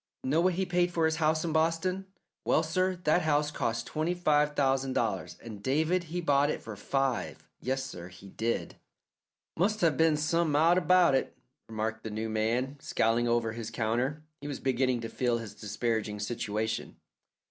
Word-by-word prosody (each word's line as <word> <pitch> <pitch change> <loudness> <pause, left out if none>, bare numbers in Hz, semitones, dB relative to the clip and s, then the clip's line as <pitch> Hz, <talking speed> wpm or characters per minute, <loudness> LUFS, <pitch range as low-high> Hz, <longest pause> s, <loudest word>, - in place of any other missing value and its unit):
Know 145 +6 +2
what 180 0 +2
he 190 +1 0
paid 175 0 +1
for 165 -2 +1
his 160 0 +1
house 155 0 +1
in 160 - -1
Boston? 165 +4 +1 0.4
Well, 160 - +3
sir, 185 +3 0
that 155 +3 +3
house 150 -2 +1
cost 115 -4 -2
twenty 160 +3 -1
five 150 -4 +2
thousand 135 -1 +1
dollars, - - -1
and 110 -3 -8
David 160 - +1
he 175 +2 -3
bought 145 -3 +3
it - - -3
for 110 -2 -7
five. 135 +4 -2
Yes, 130 +1 -1
sir, 90 -10 -7
he 90 +2 -13
did." 115 +4 -2 0.8
"Must 210 +5 +1
have 160 -6 +3
been 160 -2 +4
some 160 0 +1
out 165 +4 +5
about 180 -2 +5
it," 135 - 0 0.3
remarked 110 0 -3
the 110 - -4
new 110 +1 -3
man, 120 +6 0
scowling 115 -1 +1
over 115 -1 +1
his 115 -1 -5
counter. 125 +7 -1 0.2
He 145 - -6
was 145 -3 -4
beginning 130 -2 +1
to 115 - -4
feel 120 +1 0
his 115 -3 -7
disparaging 105 0 -2
situation. 110 0 -3
135 Hz, 180 wpm, -30 LUFS, 115-160 Hz, 0.8 s, out